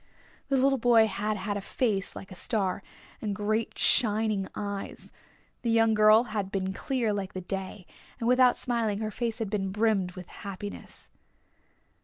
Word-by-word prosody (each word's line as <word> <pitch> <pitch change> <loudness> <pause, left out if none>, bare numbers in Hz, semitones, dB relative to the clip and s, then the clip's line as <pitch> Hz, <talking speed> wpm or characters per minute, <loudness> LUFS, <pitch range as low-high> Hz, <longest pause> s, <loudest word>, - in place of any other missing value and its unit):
The 275 - +3
little 270 +1 +3
boy 230 -1 +5
had 210 +1 -2
had 205 +1 -2
a - - -4
face 200 -3 -1
like 195 - -9
a - - -8
star, 195 -2 -1 0.4
and 210 -2 -2
great 215 +2 -1
shining 215 -4 +2
eyes. 200 -1 -5 0.5
The 235 - 0
young 225 -1 +4
girl 215 +1 +6
had 210 -5 -3
been 190 -1 -2
clear 235 0 -1
like 200 -2 -4
the 185 - -4
day, 190 0 -5 0.3
and 230 - -1
without 250 0 +5
smiling 230 -4 -1
her 215 0 -2
face 230 0 -2
had 220 -4 -3
been 195 -3 -1
brimmed 205 -3 +1
with 180 -1 -9
happiness. 200 +1 -8
210 Hz, 165 wpm, -28 LUFS, 195-230 Hz, 0.5 s, girl